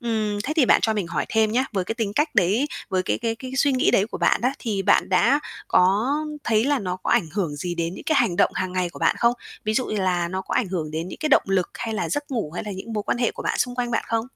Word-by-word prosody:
Ừm, 220 Hz, -3 st, -1 dB
thế 305 Hz, -, -1 dB
thì 285 Hz, -, +5 dB
bạn -, -, +5 dB
cho 220 Hz, -, +1 dB
mình 200 Hz, -5 st, -1 dB
hỏi 165 Hz, -2 st, -2 dB
thêm 220 Hz, -1 st, +2 dB
nhá, 255 Hz, +3 st, +2 dB
với, 190 Hz, -3 st, -1 dB
cái 225 Hz, -, -3 dB
tính 225 Hz, -4 st, -2 dB
cách 295 Hz, +6 st, 0 dB
đấy 205 Hz, +11 st, +3 dB, 0.2 s
với 185 Hz, -1 st, 0 dB
cái -, -, -1 dB
cái 230 Hz, -1 st, -1 dB
cái 255 Hz, +2 st, -8 dB
suy 280 Hz, +1 st, +3 dB
nghĩ 255 Hz, -, +3 dB
đấy 195 Hz, -, +3 dB
của -, -, -7 dB
bạn -, -, +2 dB
á, 255 Hz, +2 st, +2 dB
thì 210 Hz, -5 st, -2 dB
bạn -, -, +3 dB
đã 275 Hz, +10 st, +3 dB, 0.3 s
có 205 Hz, +10 st, +3 dB, 0.3 s
thấy 220 Hz, 0 st, +2 dB
là 285 Hz, -1 st, +2 dB
nó 185 Hz, -3 st, -3 dB
có 185 Hz, -, -4 dB
ảnh -, -, +3 dB
hưởng 170 Hz, -7 st, -2 dB
gì 175 Hz, +3 st, -3 dB
đến 170 Hz, +1 st, -2 dB
những -, -, -10 dB
cái 315 Hz, -, +1 dB
hành 175 Hz, -, +1 dB
động -, -, +4 dB
hàng 185 Hz, -1 st, -2 dB
ngày 180 Hz, -1 st, -1 dB
của -, -, -11 dB
bạn -, -, +2 dB
không? 235 Hz, 0 st, +4 dB, 0.3 s
Ví 215 Hz, 0 st, 0 dB
dụ 255 Hz, -, +1 dB
như 215 Hz, -, -3 dB
là 180 Hz, -3 st, 0 dB
nó 190 Hz, +1 st, -3 dB
có -, -, -5 dB
ảnh 210 Hz, -, +1 dB
hưởng 165 Hz, -5 st, -3 dB
đến 165 Hz, +3 st, -4 dB
những -, -, -8 dB
cái 310 Hz, -, 0 dB
động -, -, +5 dB
lực 190 Hz, -2 st, 0 dB
hay 225 Hz, -1 st, -4 dB
là -, -, -2 dB
giấc 290 Hz, -1 st, -3 dB
ngủ 225 Hz, -, -2 dB
hay 180 Hz, -, -4 dB
là 210 Hz, -, -5 dB
những 195 Hz, +4 st, -7 dB
mối 210 Hz, -1 st, -2 dB
quan 240 Hz, -, -1 dB
hệ 240 Hz, -, +2 dB
của -, -, -8 dB
bạn -, -, -1 dB
xung 245 Hz, 0 st, 0 dB
quanh 245 Hz, -1 st, -2 dB
bạn 225 Hz, -, 0 dB
không? 225 Hz, 0 st, -1 dB
215 Hz, 310 wpm, -23 LUFS, 185-240 Hz, 0.3 s, thì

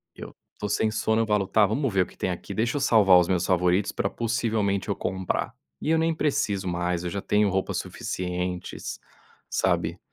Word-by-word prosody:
Eu -, -, -10 dB, 0.2 s
tô 105 Hz, -, -3 dB
sem 110 Hz, +1 st, +1 dB
sono, 110 Hz, +1 st, +1 dB
eu 110 Hz, -, 0 dB
falo: 105 Hz, -2 st, +1 dB
"Tá, 105 Hz, +1 st, +4 dB
vamos 125 Hz, +4 st, 0 dB
ver 95 Hz, -, +3 dB
o -, -, -8 dB
que -, -, -18 dB
tem -, -, -1 dB
aqui? 90 Hz, +2 st, -5 dB
Deixa 120 Hz, +7 st, 0 dB
eu -, -, -2 dB
salvar 105 Hz, -8 st, +6 dB
os 90 Hz, -, +2 dB
meus 90 Hz, -2 st, +1 dB
favoritos 90 Hz, +2 st, +2 dB
pra 100 Hz, -, -1 dB
possivelmente 110 Hz, -4 st, -1 dB
eu -, -, 0 dB
comprar." 95 Hz, -1 st, -2 dB, 0.3 s
E -, -, -2 dB
eu 160 Hz, -, +4 dB
nem 165 Hz, 0 st, +2 dB
preciso 105 Hz, -11 st, 0 dB
mais, 90 Hz, 0 st, -1 dB
eu 90 Hz, -, -2 dB
já 100 Hz, +1 st, -3 dB
tenho 105 Hz, -1 st, +2 dB
roupas 95 Hz, 0 st, -1 dB
suficientes, 90 Hz, 0 st, -4 dB, 0.5 s
sabe. -, -, 0 dB
100 Hz, 200 wpm, -26 LUFS, 90-110 Hz, 0.5 s, salvar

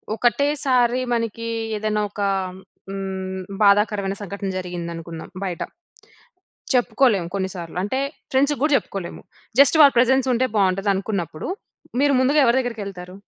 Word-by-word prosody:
ఒకటేసారి 255 Hz, 0 st, +2 dB
మనకి 230 Hz, 0 st, -2 dB, 0.3 s
ఏదేనా 210 Hz, 0 st, -1 dB
ఒక 205 Hz, -, -6 dB, 0.7 s
హ్మ్, 190 Hz, -1 st, -4 dB, 0.2 s
బాధాకరమైన 200 Hz, -1 st, +3 dB
సంఘటన 200 Hz, 0 st, -5 dB
జరిగిందనుకుందాం 170 Hz, -2 st, -6 dB
బయట. 180 Hz, -4 st, -4 dB, 1.1 s
చెప్పుకోలేం 240 Hz, -5 st, +3 dB
కొన్ని 190 Hz, -1 st, -1 dB
సార్లు. 170 Hz, -1 st, -8 dB
అంటే, 235 Hz, +7 st, -1 dB, 0.3 s
ఫ్రెండ్స్‌కి 280 Hz, +2 st, +2 dB
గూడ 300 Hz, -, +3 dB
చెప్పుకోలేము. 190 Hz, -3 st, -7 dB, 0.4 s
జస్ట్ 285 Hz, +3 st, +6 dB
వాళ్ళ 280 Hz, -2 st, +7 dB
ప్రెజన్స్ 265 Hz, +2 st, +3 dB
ఉంటే 255 Hz, +2 st, +1 dB
బావుంటదనుకున్నప్పుడు, 195 Hz, -3 st, 0 dB, 0.5 s
మీరు 285 Hz, 0 st, +4 dB
ముందుగా 285 Hz, +4 st, +4 dB
ఎవరి 235 Hz, +2 st, +4 dB
దగ్గరకెళ్తారు? 200 Hz, -7 st, -6 dB
205 Hz, 115 wpm, -22 LUFS, 190-250 Hz, 1.1 s, వాళ్ళ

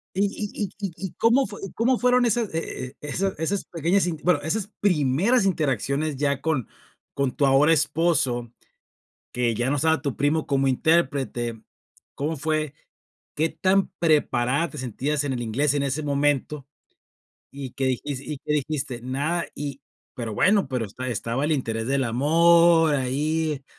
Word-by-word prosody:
Y 195 Hz, -, +2 dB
y 205 Hz, +1 st, -4 dB
y 200 Hz, -, -2 dB, 0.2 s
y 175 Hz, -, -11 dB
y, -, -, -14 dB
¿cómo 240 Hz, +4 st, +3 dB
fue 205 Hz, 0 st, -9 dB
y 195 Hz, -, -6 dB
cómo 245 Hz, +2 st, +1 dB
fueron 250 Hz, 0 st, +4 dB
esas 230 Hz, -3 st, 0 dB
e 130 Hz, -5 st, -5 dB
e 150 Hz, -, -8 dB
esas 190 Hz, +6 st, -2 dB
esas 185 Hz, +5 st, -2 dB
pequeñas 175 Hz, +3 st, +1 dB
inter 160 Hz, -3 st, -5 dB
bueno, 180 Hz, -4 st, +4 dB
esas 180 Hz, +7 st, -2 dB
primeras 185 Hz, -, +2 dB
interacciones 150 Hz, -, 0 dB
ya 140 Hz, -1 st, 0 dB
con 155 Hz, -7 st, -1 dB, 0.5 s
con 140 Hz, -2 st, 0 dB
tu 145 Hz, -, +2 dB
ahora 140 Hz, +4 st, +5 dB
esposo, 150 Hz, -6 st, +1 dB, 0.8 s
que 120 Hz, -2 st, 0 dB
ya 120 Hz, +3 st, -1 dB
no 145 Hz, -, +1 dB
estaba 160 Hz, +2 st, +2 dB
tu 140 Hz, -3 st, -3 dB
primo 150 Hz, +2 st, +1 dB
como 135 Hz, -1 st, +1 dB
intérprete? 130 Hz, -6 st, 0 dB, 0.5 s
¿Cómo 155 Hz, +3 st, -2 dB
fue 155 Hz, 0 st, -1 dB, 0.6 s
qué 160 Hz, +2 st, +2 dB
tan 190 Hz, +4 st, +1 dB
preparada 150 Hz, -2 st, +2 dB
te 150 Hz, -, -9 dB
sentías 135 Hz, +4 st, -2 dB
en 140 Hz, -, -1 dB
el 120 Hz, -, -3 dB
inglés 130 Hz, +6 st, 0 dB
en 145 Hz, -, 0 dB
ese 140 Hz, +3 st, -2 dB
momento, 145 Hz, -1 st, 0 dB, 0.9 s
y 135 Hz, -3 st, -7 dB
qué 135 Hz, -, -2 dB
dijis 130 Hz, +1 st, -2 dB
y 145 Hz, +1 st, -6 dB
qué -, -, -1 dB
dijiste? 140 Hz, -4 st, -2 dB
Nada, 145 Hz, +7 st, -1 dB
y 140 Hz, -1 st, -5 dB, 0.3 s
pero 115 Hz, -5 st, -5 dB
bueno, 195 Hz, -, +3 dB
pero 125 Hz, -3 st, -2 dB
esta 130 Hz, +6 st, -6 dB
estaba 120 Hz, +3 st, -2 dB
el 155 Hz, -, +1 dB
interés 115 Hz, -6 st, -2 dB
del 135 Hz, 0 st, +1 dB
amor 165 Hz, +5 st, +4 dB
ahí, 150 Hz, +3 st, -1 dB
145 Hz, 165 wpm, -24 LUFS, 130-165 Hz, 0.9 s, ahora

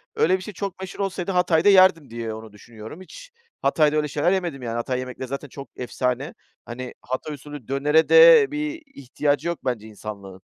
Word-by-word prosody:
öyle 185 Hz, +3 st, +3 dB
bir -, -, -11 dB
şey 210 Hz, -, -8 dB
çok 195 Hz, 0 st, -5 dB
meşhur 190 Hz, +1 st, -8 dB
olsaydı 195 Hz, -1 st, -2 dB
Hatay'da 180 Hz, 0 st, +3 dB
yerdim 185 Hz, -, +5 dB
diye 115 Hz, -1 st, -5 dB
onu 110 Hz, 0 st, -10 dB
düşünüyorum. 110 Hz, -, -12 dB
Hiç -, -, -13 dB, 0.3 s
Hatay'da 155 Hz, -2 st, +2 dB
öyle 150 Hz, -1 st, +1 dB
şeyler 150 Hz, +5 st, 0 dB
yemedim 175 Hz, -8 st, -2 dB
yani, 115 Hz, -1 st, -4 dB
Hatay 125 Hz, +2 st, -2 dB
yemekleri 130 Hz, 0 st, -6 dB
zaten 140 Hz, +2 st, -5 dB
çok 140 Hz, +2 st, -10 dB
efsane. 125 Hz, +4 st, -3 dB, 0.3 s
Hani, 125 Hz, +1 st, -7 dB
Hatay 130 Hz, +4 st, -5 dB
usulü 145 Hz, -3 st, -10 dB
dönere 145 Hz, +4 st, +2 dB
de 480 Hz, -3 st, +8 dB
bir 300 Hz, +2 st, -4 dB
ihtiyacı 145 Hz, +4 st, -1 dB
yok 170 Hz, -, -2 dB
bence 115 Hz, -4 st, -2 dB
insanlığın. 100 Hz, -3 st, -9 dB
145 Hz, 180 wpm, -23 LUFS, 125-185 Hz, 0.3 s, de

